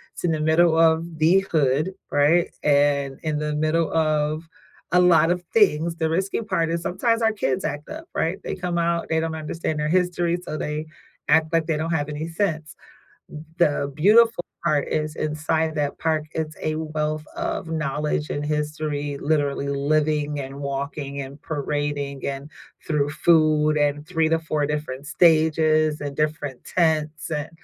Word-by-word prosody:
it's - - -9
in 170 - +2
the 155 - -1
middle 160 +1 +4
of 165 0 +2
the 170 +5 +5
hood, 155 +4 +1 0.2
right? 155 +4 +3
And, 140 -2 +2
in 155 -1 -1
the 150 0 -2
middle 155 +2 +1
of 155 0 +1 0.5
a 180 - +6
lot 165 -2 +5
of 180 0 -1
things, 170 -6 +3
the 160 -1 0
risky 190 +6 -1
part 165 -7 0
is, 170 0 -1
sometimes 230 +6 0
our 225 0 +3
kids 135 -11 -1
act 145 -1 -4
up, 320 +1 -7
right? 170 +4 -1
They - - -3
come 180 -1 -3
out, 170 0 0
they 160 - +2
don't 160 0 -2
understand 155 0 -3
our 150 - 0
history, 175 -1 +1
so 155 - -5
they 150 +1 -3 0.4
act 160 +1 +3
like 165 -1 +2
they 160 - 0
don't 160 +2 -2
have 150 -2 -1
any 150 +2 -4
sense. 165 -4 -2 0.8
The 145 -4 +1
beautiful 215 +3 +4 0.2
part 150 -4 +1
is, 155 0 -2
inside 155 +1 -1
that 145 -2 -1
park, 155 -1 0
it's 155 -1 -3
a 155 0 -1
wealth 155 -1 -2
of 335 - -3
knowledge 150 -1 -2
and 145 0 -3
history, 150 -1 -2
literally, 145 -2 0
living, 150 +1 0
and 135 0 -6
walking, 140 0 -4
and 140 +2 -9
parading, 145 -2 -3
and 140 +1 -4 0.4
through 145 -2 +1
food, 155 -1 +3
and 145 +1 0
3 160 -3 +1
to 165 - +3
4 155 -2 -1
different 145 -2 -4
stages, 155 -1 +3
and 140 -1 -5
different 150 -4 -2
tents, 155 -2 0
and 150 -1 -2
155 Hz, 165 wpm, -23 LUFS, 150-165 Hz, 0.8 s, a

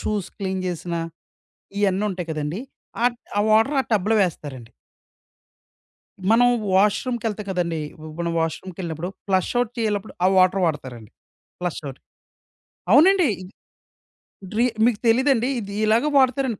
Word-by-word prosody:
Shoes 210 -4 -2
clean 190 -2 -2
జేసినా, 170 -1 -3 0.8
ఇయన్నుంటాయి 190 -3 0
కదండి! 155 +7 -3 0.4
ఆట్ 240 -1 +1 0.2
ఆ - - +4
వాటర్ 225 +7 +4
ఆ - - -10
టబ్‌లో 210 +2 +2
వేస్తారండి. 130 -9 -6 1.6
మనం 245 +2 +5 0.3
వాష్‌రూమ్‌‌కెళ్తా 210 +2 +1
కదండి! 170 -4 -1
ఇప్పుడు 155 0 -11
మనం 170 0 -1
వాష్‌రూమ్‌కెళ్ళినప్పుడు, 170 0 -4 0.2
ఫ్లష్ 190 -2 +1
ఔట్ 240 -2 -1
చేయనప్పుడు 215 -2 -2
ఆ - - +6
వాటర్ 185 +1 +4
వాడతారండి. 130 -8 -5 0.5
Flush 180 -2 -3
out. 130 - -14 0.9
అవునండి. 360 +4 +6 1.2
డ్రి 220 +2 +1 0.2
మీకు 235 -4 +2
తెలీదండి. 255 +1 +3
ఇది 200 -2 -7
ఇలాగ 225 +6 +3
వాడతారండి. 260 -4 +2
195 Hz, 115 wpm, -23 LUFS, 170-230 Hz, 1.6 s, ఆ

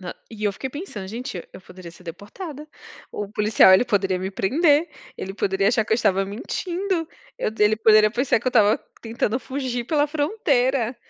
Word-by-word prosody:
Nã 180 -2 -6 0.2
e, 215 -2 -7
eu 205 - +1
fiquei 260 +6 -6
pensando 285 - -7
gente, 225 -4 -6
eu - - -11
poderia 180 -2 -12
ser 170 - -17
deportada. 280 - -9 0.5
O 205 - -4
policial, 210 -2 +5
ele 190 +6 +6
poderia 195 -5 0
me 190 +1 -4
prender, 295 - +2 0.3
ele 190 - -6
poderia 195 0 +1
achar 220 -2 +2
que - - -2
eu - - +6
estava 195 -4 +1
mentindo. 340 - -3 0.3
Eu - - -1
ele 210 +1 +4
poderia 215 -1 +5
pensar 240 0 +1
que - - -15
eu - - +3
estava 215 -3 +4 0.2
tentando 230 0 -2
fugir 255 -3 -4
pela 295 +3 +1
fronteira. 275 - 0
225 Hz, 185 wpm, -23 LUFS, 200-280 Hz, 0.5 s, ele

